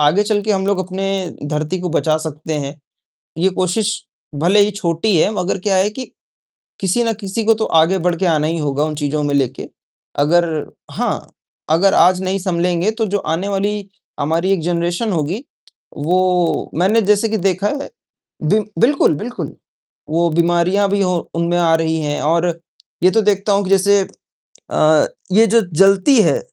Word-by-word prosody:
आगे 150 +7 +3
चलके 210 0 -1
हम 190 0 -1
लोग 200 -1 +1
अपने 190 +1 -3 0.4
धरती 155 +4 -2
को 180 - -3
बचा 155 -1 +1
सकते 155 0 -5
हैं, 140 +1 -5 0.6
ये 185 +3 +2
कोशिश 185 +4 0 0.4
भले 175 +8 +3
ही 205 +1 +4
छोटी 185 0 -1
है 200 - +3
मगर 180 -1 -1
क्या 195 0 0
है 190 +2 +2
कि, 255 +4 -8 0.7
किसी 195 +5 +1
ना 230 - 0
किसी 210 +1 -4
को 225 - +5
तो 220 0 -2
आगे 165 +4 +3
बढ़ 175 0 0
के 190 - -1
आना 155 -3 +2
ही 165 +1 -2
होगा 145 -1 -1
उन 155 0 -2
चीज़ों 150 0 -2
में 145 -1 -1
लेके। 135 -2 -2 0.5
अगर 170 +4 +3 0.5
हाँ, - - -3 0.4
अगर 180 +5 +3
आज 180 +1 +4
नहीं 190 +1 -1
सँलेंगे 180 +1 0
तो 220 0 -2
जो 205 0 -1
आने 165 +4 -2
वाली 200 0 -2 0.3
हमारी 165 +6 0
एक 195 -4 +1
जनरेशन 175 +5 -1
होगी, 175 - -2 0.5
वो 180 +2 +1
मैंने 195 +7 +3
जैसे 210 +2 +2
कि 220 - 0
देखा 190 +1 0
है 285 +4 -4 0.5
बि 205 +8 +3 0.2
बिल्कुल, 275 - +3
बिल्कुल, 245 +9 -6 0.5
वो 170 +2 +1
बीमारियाँ 175 +4 +2
भी 200 0 0
हो 180 -2 +1 0.2
उनमें 170 +1 0
आ 170 -2 +3
रही 160 0 0
हैं 145 -1 -2
और 165 +3 +1 0.6
ये 185 - +5
तो 225 +2 +3
देखता 205 0 +1
हूँ 200 +1 +2
कि - - -4
जैसे 195 +1 +4 0.7
अ, 155 0 +3 0.3
ये 220 +4 +5
जो 230 +2 +4 0.2
जलती 195 +7 +5
है, - - +2
185 Hz, 175 wpm, -18 LUFS, 165-205 Hz, 0.7 s, को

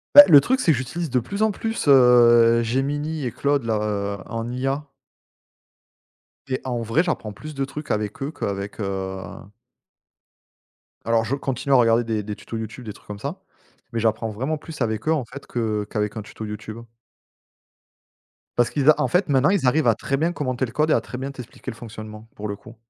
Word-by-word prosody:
Bah, 195 - +14
le 150 -6 +9
truc, 260 - +1
c'est 170 - +3
que 140 - +2
j'utilise 155 +6 -4
de 125 - +2
plus 200 - -5
en 220 - +3
plus, 225 -4 -3
heu, 120 -3 +6
Gemini 145 +5 -1
et 120 - -2
Claude, 140 +2 0
là, 110 -1 +1
heu, 100 -1 -2
en 115 +1 -3
IA 135 +3 -2 1.6
et 130 -1 -2
en 120 -2 -2
vrai, 115 +9 +2
j'apprends 110 - -3
plus 155 +9 -9
de 135 0 -1
trucs 150 +2 -6
avec 105 +7 -2
eux, 145 - -3
qu'avec, 100 -7 -4
heu 95 -2 -3 1.8
alors, 115 0 +2
je 130 +5 -1
continue 135 0 -2
à - - +7
regarder 115 -1 +4
des 110 -2 -2
des 105 0 -5
tutos 115 - -7
YouTube, 110 +3 -6
des 105 - -6
trucs - - -20
comme 105 -1 -7
ça, 150 - -5 0.5
mais 115 - 0
j'apprends 110 0 0
vraiment 130 +9 -2
plus 150 -1 -10
avec 110 +1 -1
eux, 160 - +4
en 145 -6 -1
fait, 140 +5 -10
que 110 -3 -1
qu'avec 105 -1 -2
un 110 - -3
tuto 110 +1 -8
YouTube 105 +1 -7 1.8
parce 120 0 +3
qu'ils 145 0 +2
a 155 - +6
en - - +2
fait 180 -1 +1
maintenant 140 +3 +4
ils 180 -10 +2
arrivent 145 +2 +3
à 115 - +5
très 135 +5 -2
bien 165 +4 +1
commenter 130 -4 -1
le 115 - -9
code 155 +1 +1
et - - +5
à - - +4
très 125 - -8
bien 135 +1 -4
t'expliquer 130 -1 -9
le 120 - -6
fonctionnement 110 -1 -9
pour 105 +1 -6
le 100 - -3
coup. 110 +3 -14
120 Hz, 205 wpm, -23 LUFS, 110-145 Hz, 1.8 s, Bah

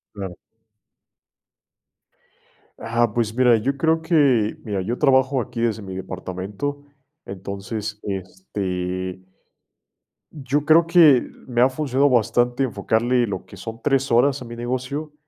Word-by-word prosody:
Claro. 95 -4 -6 2.4
Ah, 115 -1 0
pues 115 -2 0
mira, 125 -1 +4
yo 135 +6 -2
creo 160 +2 +2
que, 140 -10 +2
mira, 100 -4 -2
yo 115 +6 -3
trabajo 130 -1 +3
aquí 115 0 -5
desde 110 -2 0
mi 95 -1 -7
departamento, 95 +9 -5 0.4
entonces 100 +3 -6
este 95 -1 -4 1.1
yo 145 0 -2
creo 165 +2 +5
que, 160 -7 +6 0.2
me 120 -1 0
ha 130 - +6
funcionado 140 0 +1
bastante 120 +1 +2
enfocarle 120 +2 +1
lo 100 - -5
que - - -14
son 115 0 -8
3, 135 -2 +1
horas 135 +4 +3
a - - -7
mi 120 0 -8
negocio, 130 +5 -4
120 Hz, 125 wpm, -22 LUFS, 100-135 Hz, 2.4 s, que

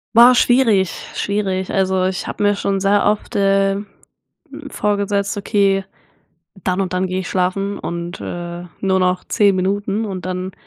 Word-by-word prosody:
Boah, 240 +2 +9
schwierig, 235 -7 +3 0.2
schwierig. 195 -2 -2
Also, 190 -1 +1
ich 185 0 -2
habe - - -6
mir 205 0 +3
schon 195 -1 -1
sehr 200 +1 +2
oft, 210 0 -1
äh, 195 0 +2
hm, 200 +1 -5 0.8
vorgesetzt: 200 -3 -1
„Okay, 200 -1 +1 0.8
dann 185 0 0
und 185 -2 -2
dann 185 +1 0
gehe 185 +1 -2
ich - - -7
schlafen 195 +2 -1
und, 170 0 -5
äh, 175 0 -6
nur 190 -1 +1
noch 180 0 +1
10 200 -2 +2
Minuten“ 200 +3 -1
und 185 -4 -5
dann 185 0 -4
195 Hz, 160 wpm, -19 LUFS, 185-205 Hz, 0.8 s, Boah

